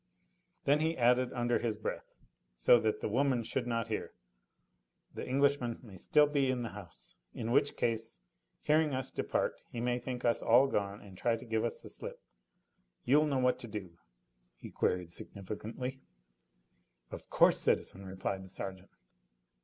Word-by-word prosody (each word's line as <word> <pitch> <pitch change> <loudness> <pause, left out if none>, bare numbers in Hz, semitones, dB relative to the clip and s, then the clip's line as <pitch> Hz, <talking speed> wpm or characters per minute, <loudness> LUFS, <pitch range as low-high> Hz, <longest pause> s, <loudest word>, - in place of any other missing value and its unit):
Then 145 +2 +4
he 160 +1 0
added 125 +1 +3
under 120 0 +1
his 115 -3 -1
breath, 110 - -5 0.4
so 90 - +6
that 110 -1 0
the - - -1
women 130 +2 +1
should 125 +2 -2
not 115 -1 0
hear: - - -4 1.0
"The - - -5
Englishman 140 -3 +2
may 105 -6 -12
still 150 +10 +4
be 145 -2 +1
in 125 -2 0
the 115 - -3
house. 95 -5 -11 0.2
In 115 +1 -3
which 140 +2 +3
case, 115 - -1 0.4
hearing 150 -2 +3
us 130 -1 -3
depart, - - -1
he 120 - -6
may 120 +1 0
think 125 -1 -5
us 120 - +2
all 120 +4 +6
gone 100 -6 -2
and 100 -2 -13
try 115 +5 +1
to 115 - -9
give 110 -1 0
us 120 - -2
the - - -10
slip. - - -7 0.9
You'll 150 +5 +5
know 140 -2 0
what 125 -1 +2
to 120 - -7
do?" 100 -6 -7 0.6
he - - -10
queried 90 -2 0
significantly. 110 +9 -5 1.1
"Of - - -8
course, - - +5
citizen," 95 - +1
replied 95 0 -4
the 95 - -12
sergeant. 95 0 -5
120 Hz, 165 wpm, -33 LUFS, 105-130 Hz, 1.1 s, so